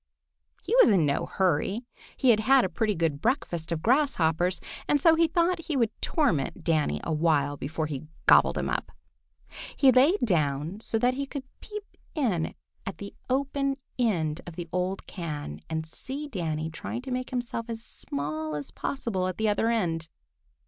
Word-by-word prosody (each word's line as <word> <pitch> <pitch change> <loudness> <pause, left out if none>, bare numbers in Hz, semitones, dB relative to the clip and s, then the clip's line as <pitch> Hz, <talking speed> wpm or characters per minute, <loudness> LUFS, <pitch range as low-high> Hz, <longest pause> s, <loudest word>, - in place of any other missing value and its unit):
He 470 - 0
was - - +8
in 180 -6 +4
no 140 -1 0
hurry. 190 +6 0 0.3
He 260 -3 +5
had 215 - +4
had 260 +3 +5
a - - -2
pretty 215 -3 0
good 160 -4 0
breakfast 175 - -1
of 160 -2 -2
grasshoppers, 185 - +2 0.3
and 290 - +3
so 325 +3 +6
he 330 0 +4
thought 340 +1 +1
he 305 -4 0
would 230 -4 +2
torment 250 - 0
Danny 150 - +1
a - - -1
while 150 -3 +2
before 155 +3 -3 0.4
gobbling - - +5
him - - -2
up. - - -2 0.9
He 270 -2 +7
lay 275 +10 +5
down 155 - 0
so 225 - -2
that 245 +3 +3
he 275 +1 -3
could 275 -1 -5 0.2
peep 420 -1 -7 0.3
in 210 - 0 0.3
at 195 - -6
the 200 0 -8 0.2
open 275 +1 0 0.2
end 165 -10 +1
of 170 - -8
the 175 0 -5
old 185 +1 -2
can 150 - -5
and 160 0 -2
see 270 - -6
Danny 160 - -3
trying 230 +9 -5
to 265 - -6
make 255 0 -2
himself 240 -2 -3
as 225 0 -5
small 155 +2 -4
as 145 -1 -5
possible 210 -9 -2
at 185 - -4
the 220 - +1
other 215 +2 +2
end. 170 -8 0
200 Hz, 175 wpm, -27 LUFS, 160-260 Hz, 0.9 s, was